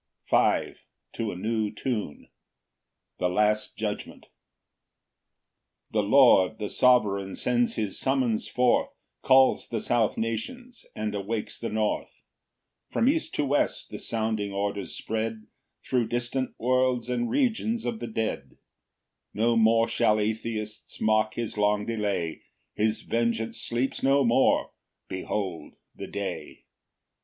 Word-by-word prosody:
Psalm - - +3
50:5. - - -12 0.4
To 110 -2 -2
a - - -7
new 110 +2 -1
Tune. 110 - -4 0.9
The 90 - +1
last 105 +3 +1
judgment. 105 -1 -5 1.7
1 105 -1 +1
The 100 - -4
Lord 110 -7 +6
the 105 -2 -4
Sovereign 100 -6 +3
sends 120 -1 +1
his 105 -4 -2
summons 130 -5 0
forth, 125 -1 +2 0.3
Calls 130 0 +4
the 115 - -2
south 115 -3 +1
nations, 240 - -5
and 105 -1 -3
awakes 105 +2 -3
the 115 - -3
north; 110 0 -2 0.7
From 235 - +1
east 320 +3 +1
to 145 - +1
west 140 +1 0
the - - -6
sounding 110 -3 -1
orders 100 0 -3
spread 110 0 -3 0.4
Thro' 120 -3 +1
distant 120 +2 -2
worlds 125 0 +1
and 120 -1 -1
regions 230 -3 0
of 225 - -2
the - - -5
dead: 110 -12 -3 0.8
No 115 +3 +2
more 115 0 +4
shall 110 -2 +2
atheists 110 0 -4
mock 110 0 +2
his 115 -2 -4
long 105 0 +2
delay; 100 -7 -2 0.3
His 110 +1 0
vengeance 115 -1 -1
sleeps 120 +3 -1
no 135 +1 +4
more: 120 +2 +3 0.4
behold 95 -3 -4 0.2
the - - -7
day! - - -6
110 Hz, 130 wpm, -27 LUFS, 105-125 Hz, 1.7 s, Lord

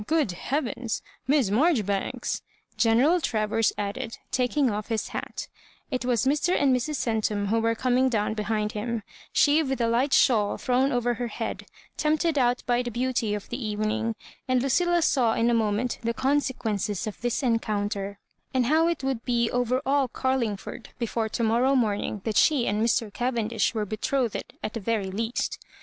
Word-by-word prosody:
Good 310 - +2
heavens, 245 - -3 0.2
Miss 270 -7 +3
Marjoribanks 215 - +1
I'* - - -38
General 255 +10 +4
Travers 220 -3 +1
added, 225 +4 -4
taking 255 +2 +2
off 210 0 -3
his 225 -2 -2
hat - - -5 0.4
It 255 -2 -1
was 245 -1 +1
Mr. 300 +6 +2
and 270 -2 +4
Mrs. 275 +5 -1
Centum 215 -5 0
who 225 +2 +2
were 230 0 +1
coming 255 +2 +2
down 215 -3 0
behind 210 0 -1
him 225 +1 -3
— - - -22
she 295 +2 +5
with 270 -4 -2
a 235 - +2
light 245 +5 +1
shawl 215 -7 +4
thrown 260 +2 +1
over 245 -1 +1
her 240 +1 -3
head, 220 - -5 0.3
tempted 310 0 +1
out 245 0 +2
by 245 0 +2
the 245 - -3
beauty 240 -3 -1
of 205 - -7
the 245 +1 -4
evening; 215 +1 -1 0.3
and 255 -1 +2
Lucilla 345 +5 +2
saw 240 -7 +3
in 235 +1 +2
a - - +2
moment 225 +1 0
the 230 0 -1
consequences 230 -8 0
of 215 - -6
this 240 +2 -1
encounter, 205 -4 -1 0.4
and 255 -2 +3
how 315 +5 +3
it 335 -5 -1
would 265 -3 -1
be 235 -2 +1
over 245 +2 0
aH 275 0 +2
Carlingford 245 -3 -2
before 230 -2 -1
to 235 - -2
morrow 240 +5 +3
morning 210 -4 0
that 220 -2 -1
she 285 -6 +4
and 210 +2 0
Mr. 225 -2 +1
Cavendish 235 -4 0
were 215 -1 0
betrothed 225 +3 -1 0.2
at - - -3
the 230 - -3
very 205 -2 -1
least. 225 +4 -2
235 Hz, 175 wpm, -26 LUFS, 215-260 Hz, 0.4 s, she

